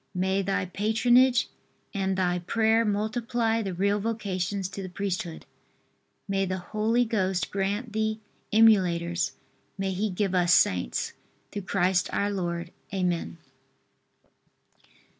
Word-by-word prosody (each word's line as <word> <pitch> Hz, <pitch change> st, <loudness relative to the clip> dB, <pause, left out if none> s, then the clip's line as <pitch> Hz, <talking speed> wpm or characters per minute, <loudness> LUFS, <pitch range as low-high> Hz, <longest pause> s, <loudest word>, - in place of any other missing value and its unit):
May 190 Hz, +2 st, +1 dB
thy 195 Hz, -1 st, -1 dB
patronage, 240 Hz, +6 st, +3 dB, 0.5 s
and 190 Hz, -2 st, -1 dB
thy 180 Hz, -1 st, +1 dB
prayer 220 Hz, +5 st, +2 dB
multiply 225 Hz, +2 st, 0 dB
the 195 Hz, -4 st, -4 dB
real 200 Hz, +3 st, +1 dB
vocations 200 Hz, -3 st, -2 dB
to 195 Hz, 0 st, -6 dB
the 185 Hz, -, -6 dB
priesthood. 180 Hz, -3 st, -4 dB, 0.8 s
May 195 Hz, -1 st, +1 dB
the 185 Hz, 0 st, -2 dB
Holy 220 Hz, +6 st, 0 dB
Ghost 190 Hz, -5 st, -1 dB
grant 205 Hz, +4 st, -2 dB
thee 220 Hz, 0 st, 0 dB, 0.3 s
emulators; 180 Hz, -6 st, +3 dB, 0.4 s
may 195 Hz, -1 st, -1 dB
He 200 Hz, +3 st, -1 dB
give 195 Hz, 0 st, -1 dB
us 175 Hz, -1 st, +4 dB
Saints! 90 Hz, -9 st, +1 dB, 0.4 s
Through 205 Hz, -, -4 dB
Christ, 180 Hz, -1 st, +2 dB
our 205 Hz, +1 st, 0 dB
Lord. 175 Hz, -3 st, -3 dB, 0.2 s
Amen. 180 Hz, -3 st, -1 dB
195 Hz, 120 wpm, -27 LUFS, 180-220 Hz, 0.8 s, us